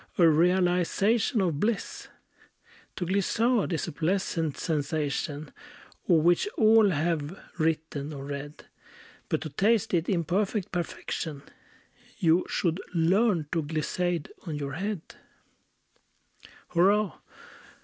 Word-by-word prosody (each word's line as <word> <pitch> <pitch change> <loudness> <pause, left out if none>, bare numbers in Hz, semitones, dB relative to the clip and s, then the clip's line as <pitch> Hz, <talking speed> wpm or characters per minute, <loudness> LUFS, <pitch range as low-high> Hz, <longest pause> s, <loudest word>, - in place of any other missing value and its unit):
A 170 - +6
realization 180 - +2
of 165 -6 0
bliss! 215 +2 -2 0.9
To 175 - -3
glissade 205 +4 +1
is 165 - -1
a - - -4
pleasant 165 -1 -1
sensation, 150 -1 -2 0.6
Of 165 -3 +5
which 175 - +3
all 220 -2 +6
have 160 0 -1 0.2
written, 155 -2 -1
or 140 -2 -7
read; 145 +1 -7 0.6
But - - 0
to 155 - -5
taste 215 +8 +1
it, 170 -1 +1
in 175 -4 +1
perfect 195 +4 -1
perfection, 160 -3 -4 0.7
You 170 +1 +3
should 170 +1 0
learn 180 +1 +3
to 165 - +1
glissade 160 +2 -2 0.2
on 155 - -3
your 140 -2 -4
head. 200 -1 -3 1.7
Hurrah! 195 +3 +2
170 Hz, 110 wpm, -28 LUFS, 155-195 Hz, 1.7 s, A